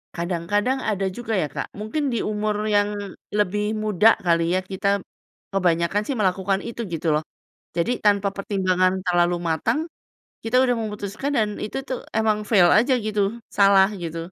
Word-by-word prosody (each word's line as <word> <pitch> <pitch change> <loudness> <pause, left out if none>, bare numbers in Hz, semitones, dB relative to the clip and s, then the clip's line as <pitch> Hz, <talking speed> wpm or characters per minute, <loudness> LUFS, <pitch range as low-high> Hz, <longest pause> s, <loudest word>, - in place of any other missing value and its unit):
Kadang-kadang 185 +9 -1
ada 200 -2 -1
juga 230 -2 -4
ya 150 - -1
Kak, - - -5
mungkin 270 +7 -2
di 235 - -1
umur 210 0 -1
yang 205 -1 +2 0.5
lebih 210 +1 0
muda 215 +1 +4
kali 170 -2 +2
ya, - - +2
kita 200 +1 +1 0.5
kebanyakan 175 +1 +1
sih 275 - -1
melakukan 195 0 +1
itu 235 0 -5
gitu 165 +1 -3
loh. 155 - 0 0.5
Jadi 170 +7 +1
tanpa 200 -1 +4
pertimbangan 185 -2 +1
terlalu 175 0 +3
matang, 160 - 0 0.6
kita 225 +3 +1
udah 245 -1 +2
memutuskan, 215 +4 -4
dan 215 -2 +2 0.2
itu 215 - -5
tuh 255 - -3 0.2
emang 220 -1 +2
fail 185 -6 +6
aja 245 +5 +4
gitu, 210 -1 0 0.4
salah 195 -1 +6 0.2
gitu. 165 +1 -5
200 Hz, 155 wpm, -23 LUFS, 180-215 Hz, 0.6 s, fail